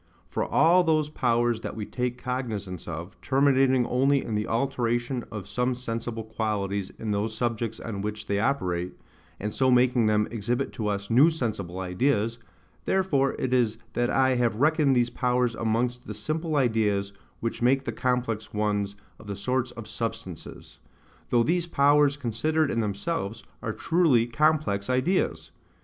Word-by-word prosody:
For - - -2
all 180 +2 +4
those 155 -3 +2
powers 120 -4 +1
that - - -5
we 110 -2 -4
take 125 +1 -3
cognizance 115 -8 -4
of, 85 +5 -7
terminating 135 -2 +3
only 135 +3 +2
in 110 - -4
the 105 0 -1
alteration 120 0 -1
of 105 -4 -6
some 125 +5 0
sensible 115 -2 -4
qualities 100 -3 -2
in 110 - -3
those 105 +2 -1
subjects 115 -2 -2
on 100 -4 -5
which 105 +1 -4
they 100 0 0
operate, 90 -8 -1 0.4
and 105 +1 -3
so 130 -1 +2
making 125 -2 +4
them 105 0 +2
exhibit 120 +4 -2
to 110 - -3
us 100 0 -2
new 135 +8 +7
sensible 110 - -3
ideas, 110 +4 0 0.5
therefore 150 -8 +1
it 130 -1 -1
is 115 -3 +2 0.2
that 120 0 +1
I 130 0 +3
have 120 -3 +1
reckoned 145 +2 +3
these 120 -1 +2
powers 125 -1 +1
amongst 120 +2 -1
the 105 - -5
simple 155 +8 -2
ideas 105 -6 +1 0.3
which 115 +1 -3
make 135 +3 +3
the - - -2
complex 125 -5 -2
ones 105 -1 0 0.2
of 110 - -13
the 100 - -4
sorts 125 +5 -1
of 115 -3 -9
substances; 115 -7 -6 0.5
though 120 -1 +4
these 170 +5 0
powers 145 -1 +4
considered 145 +5 0
in 115 - 0
themselves, 110 - -2 0.2
are - - -2
truly 160 -9 +3
complex 130 -6 +1
ideas. 130 +9 0
120 Hz, 160 wpm, -26 LUFS, 105-135 Hz, 0.5 s, new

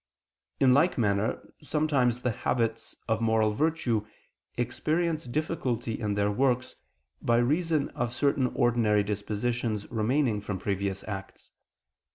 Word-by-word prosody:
In 130 -2 +5
like 160 +7 +3
manner 105 -2 0
sometimes 140 -6 +1
the 125 - +1
habits 115 0 -1
of 110 -1 0
moral 110 -1 +2
virtue 125 -6 0 0.5
experience 155 +6 0
difficulty 125 -4 -2
in 105 -3 -1
their 100 0 +1
works, 125 +2 +1 0.5
by 115 0 +2
reason 150 +4 +1
of 120 -4 -3
certain 135 0 +1
ordinary 110 -4 +3
dispositions 105 +2 -2
remaining 115 0 +1
from 100 -2 -4
previous 100 0 -2
acts. 95 -2 -8
120 Hz, 120 wpm, -28 LUFS, 105-140 Hz, 0.5 s, In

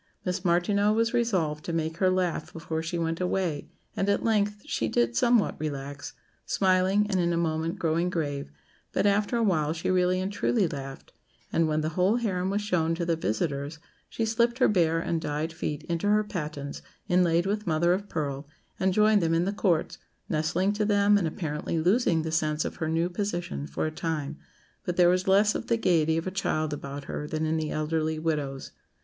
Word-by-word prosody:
Miss 180 0 -2
Martineau 200 +4 +2
was 230 +2 +1
resolved 180 -11 0
to - - -3
make 160 0 -2
her 185 0 +3
laugh 180 -4 -1
before 160 -1 -4
she 165 +2 -3
went 165 +1 -2
away, 180 -5 -1 0.3
and 195 - 0
at 200 - +1
length 210 -2 +1
she 115 - -1
did 115 +1 +1
somewhat 235 - +3
relax 140 -2 -5 0.3
smiling, 190 +2 +2
and 190 -3 0
in 170 -1 +2
a 170 - 0
moment 165 0 -1
growing 165 +2 0
grave; 145 - -3 0.4
but - - +1
after 205 +3 +2
a 230 - +1
while 160 -7 +1
she 165 +2 -2
really 185 0 +2
and 190 +2 -3
truly 205 -1 +1
laughed, 135 -3 -8 0.4
and 165 -1 +3
when 155 0 0
the 155 - -1
whole 185 +6 +2
harem 190 -6 -1
was 205 +1 -1
shown 165 -5 +1
to 170 0 -2
the 170 -1 +1
visitors, 140 +2 -2 0.3
she 225 - -2
slipped 235 +2 +1
her 260 - +4
bare 165 -5 +2
and 165 0 -1
dyed 155 +2 -2
feet 155 -2 -4
into 170 +4 -2
her 210 +1 +4
pattens, 150 -7 -5 0.3
inlaid 175 -1 +3
with 210 +1 -2
mother 170 +2 +3
of 200 +2 -3
pearl, 140 -2 -3 0.3
and 190 -1 +1
joined 215 -1 +5
them 165 0 +2
in 170 +2 +2
the 200 - -1
courts, 180 -6 0 0.3
nestling 165 +6 0
to 210 +1 0
them, 205 0 +4
and 195 -5 +2
apparently 155 -1 -3
losing 175 -1 +2
the 160 - -3
sense 155 -1 0
of - - -5
her 160 -2 -2
new 165 +2 +1
position 175 - -3
for 70 - -2
a 155 - -1
time; 155 -2 -3 0.4
but 180 - -3
there 175 -1 +6
was 185 +1 +1
less 205 +2 +4
of 235 - -4
the 230 - +2
gaiety 160 -6 +2
of 165 - -2
a 185 - -2
child 155 -5 -1
about 140 0 -6
her 150 - -5
than 155 +1 -2
in 155 +1 0
the 155 -1 -2
elderly 155 +1 -1
widows. 150 -4 -2
170 Hz, 200 wpm, -27 LUFS, 155-195 Hz, 0.4 s, there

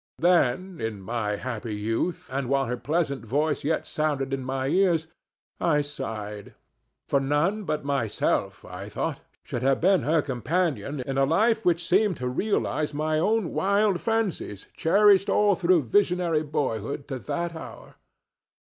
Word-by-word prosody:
Then, 175 0 +2
in 110 -2 -3
my 110 -1 -2
happy 115 -1 -4
youth, 115 +11 -2
and 135 -2 -2
while 135 0 +2
her 125 0 -2
pleasant 140 -1 -1
voice 145 +7 0
yet 155 +3 0
sounded 145 -3 -1
in 135 -1 -2
my 130 +1 -2
ears, 175 -1 +2 0.5
I 150 -3 +2
sighed; 110 -8 -6 0.5
for 140 - +2
none 150 +10 0
but 150 -4 -2
myself, 140 -7 -1
I - - -8
thought, - - -3 0.2
should 120 - -4
have 135 +1 +2
been 190 +2 +4
her 155 0 +2
companion 140 - -1
in 135 +1 -2
a 135 - +4
life 220 +9 +2
which 175 -1 +1
seemed 190 -2 +3
to 125 - -3
realize 150 -1 -1
my 155 +1 0
own 210 0 +1
wild 200 -1 +2
fancies 215 - -2
cherished 200 +3 +4
all 205 -1 +4
through 175 -3 +3
visionary 175 - +2
boyhood 140 -5 -3
to 135 -2 -3
that 170 - -3
hour. 160 - -10
150 Hz, 150 wpm, -26 LUFS, 130-180 Hz, 0.5 s, been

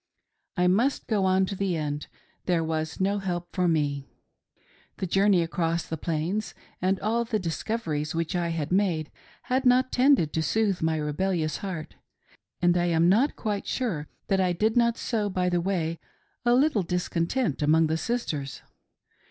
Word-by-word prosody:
I 180 - +3
must 230 +10 +2
go 205 -4 +1
on 190 0 +3
to 195 - -4
the 190 -3 -1
end 150 -1 -3 0.2
— - - -38
there 175 -3 +2
was 160 -1 -3
no 200 +2 +1
help 175 -2 -3
for 180 -2 +2
me. 145 -4 0 0.9
The - - -2
journey 195 0 +3
across 165 0 -1
the 160 - -4
Plains, 170 +5 -2 0.3
and 185 +1 +1
all 230 +3 +1
the 230 -1 -1
discoveries 165 -4 -3
which 165 +1 -1
I 175 -1 0
had 160 -2 -3
made, 180 -5 +1 0.3
had 260 +1 0
not 255 0 +4
tended' 250 - +3
to 160 - 0
soothe 195 +3 +1
my 160 0 +1
rebellious 155 +1 -1
heart, 170 -6 -6 0.7
and 175 0 +4
I 175 0 +2
am 170 0 +3
not 240 +10 +3
quite 205 -3 -3
sure 185 - -2 0.2
that 195 -1 +1
I 180 -1 +2
did 215 +5 +1
not 235 -1 +3
sow 215 -4 -1
by 185 -1 0
the 175 -1 +1
way 170 -3 -1 0.5
a 240 0 +5
little 270 -4 +3
discontent 180 - -1
among 160 +2 +4
the 160 +1 0
sisters. 160 - -3
180 Hz, 170 wpm, -26 LUFS, 160-210 Hz, 0.9 s, a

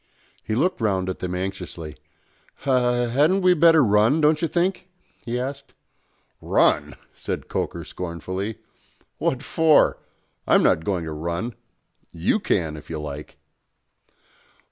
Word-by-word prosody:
He 110 - -2
looked 165 +3 0
round 95 -4 0
at 95 - -4
them 90 0 -3
anxiously. 90 -4 -5 0.7
"H - - -16 0.5
hadn't 155 +9 +3
we 180 0 +5
better 165 -2 +6
run, 110 +6 +3
don't 155 0 +3
you 165 - +1
think?" 180 +2 -1 0.4
he 120 +1 -1
asked. 140 +2 -6 0.7
"Run!" - - +2 0.2
said - - -5
Coker - - -3
scornfully. 95 +4 -5 0.6
"What 130 +1 -1
for? 160 0 +3 0.5
I'm - - +5
not 80 - +2
going 95 -4 -1
to 80 - -5
run. 85 +9 -3 0.6
You 85 - 0
can, 80 - -1
if 75 - -13
you 80 -2 -4
like." 75 0 -7
105 Hz, 130 wpm, -23 LUFS, -, 0.7 s, better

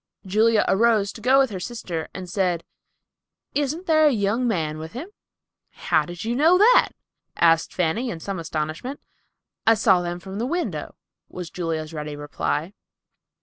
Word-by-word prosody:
Julia 215 +3 +3
arose 210 -1 +3
to 220 - -11
go 260 +3 +4
with 270 -4 +3
her 190 - -4
sister, 180 -6 -5
and 185 -1 -7
said, 180 -3 0 0.9
"Isn't 295 +5 -1
there 310 -2 +5
a - - +4
young 225 +2 0
man 155 -8 -1
with 160 +1 -8
him?" 285 +11 -6 0.6
"How 155 -2 0
did 175 +3 -7
you 235 +1 -1
know 320 +7 +5
that?" 455 +6 +5 0.4
asked 165 -1 +3
Fanny, 185 +8 -1
in 170 - -5
some 195 +2 -4
astonishment. 160 - -4 0.7
"I 225 - +7
saw 195 -4 +4
them 175 0 -4
from 190 +2 -7
the 240 - -1
window," 345 +4 -3 0.3
was 180 -2 -7
Julia's 165 -2 -3
ready 150 -1 -5
reply. 145 +4 -3
195 Hz, 160 wpm, -23 LUFS, 165-240 Hz, 0.9 s, I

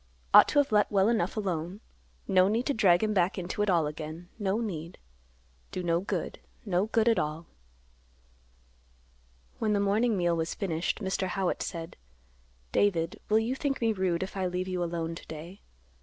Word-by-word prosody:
Ought - - +9
to - - -1
have 285 -4 +3
let 210 -1 +3
well 200 +1 +3
enough 220 -4 0
alone. 185 -2 -2 0.5
No 185 -1 +5
need 225 +5 0
to 285 - +1
drag 190 -5 +4
him 215 0 +1
back 185 -1 +1
into 185 +3 -3
it 210 - +1
all 170 -4 +3
again; 155 +3 -6
no 200 +1 0
need. 170 -7 -5 0.7
Do 185 - -4
no 170 -1 +2
good; 195 - -4 0.3
no 190 0 +1
good 225 0 +2
at 230 - +4
all." 155 +2 -3 2.1
When 215 -2 +1
the 205 - +2
morning 210 +3 +2
meal 175 -1 +2
was 165 0 -2
finished, 170 +1 -2
Mr. 190 0 -1
Howitt 185 0 -1
said, 165 -1 -5 0.7
"David, 170 -4 +1
will 215 - +4
you 225 +3 +1
think 275 0 -2
me 225 -2 +2
rude, 185 -3 0
if 190 - -7
I 190 -1 0
leave 180 +1 -3
you 180 -1 -1
alone 165 -1 -3
to 165 - -10
day? 165 +5 -9
185 Hz, 180 wpm, -29 LUFS, 170-210 Hz, 2.1 s, Ought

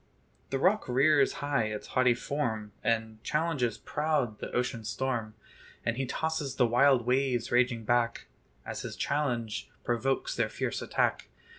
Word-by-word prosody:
The 135 - 0
rock 190 +7 +2
rears 140 +2 +4
high 140 -6 +1
his 105 -1 -5
haughty 125 -1 +3
form, 115 -6 -2
And 110 -2 -1
challenges 150 -8 0
proud 150 -8 -1
the - - -5
ocean 125 -2 -1
storm; 110 0 -2 0.5
And 115 - +1
he 135 +1 -2
tosses 160 -3 -2
the 125 - +4
wild 125 +1 +4
waves 125 -1 +1
raging 120 -1 +2
back, 120 0 +1 0.4
As - - -5
his - - -6
challenge 125 -7 -1
provokes 130 +3 0
their - - +1
fierce - - -3
attack. - - 0
125 Hz, 145 wpm, -30 LUFS, 115-140 Hz, 0.5 s, rears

